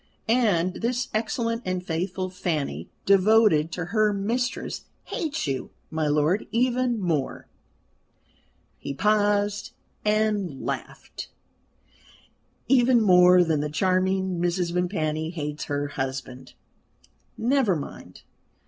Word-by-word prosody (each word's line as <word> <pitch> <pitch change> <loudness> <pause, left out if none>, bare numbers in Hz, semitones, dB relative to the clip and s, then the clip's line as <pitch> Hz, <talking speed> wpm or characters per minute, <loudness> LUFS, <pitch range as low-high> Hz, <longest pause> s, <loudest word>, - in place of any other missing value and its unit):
And 205 -7 +2
this 245 +2 -1
excellent 230 +1 -1
and 185 -1 -3
faithful 185 +2 -2
Fanny, 150 - -3 0.2
devoted 195 -5 +4
to 175 - -3
her 215 -1 +3
mistress, 230 +5 -2 0.2
hates 315 -4 -3
you, 135 -3 -3 0.2
my 160 -1 0
lord, 150 +7 +1
even 245 0 +1
more" 160 -8 -2 1.3
he 140 - -5
paused 205 +1 +1 0.3
and 210 -8 0
laughed - - -6 1.4
"even 250 -2 +5
more 180 -3 +6
than 160 -3 +1
the 150 - -2
charming 185 +3 +1
Mrs. 175 0 0
Vimpany 160 -3 -1
hates 150 -3 -4
her 145 0 -2
husband. 130 -2 -5 0.8
Never 240 -5 +2
mind. 145 - -8
185 Hz, 105 wpm, -25 LUFS, 155-215 Hz, 1.4 s, more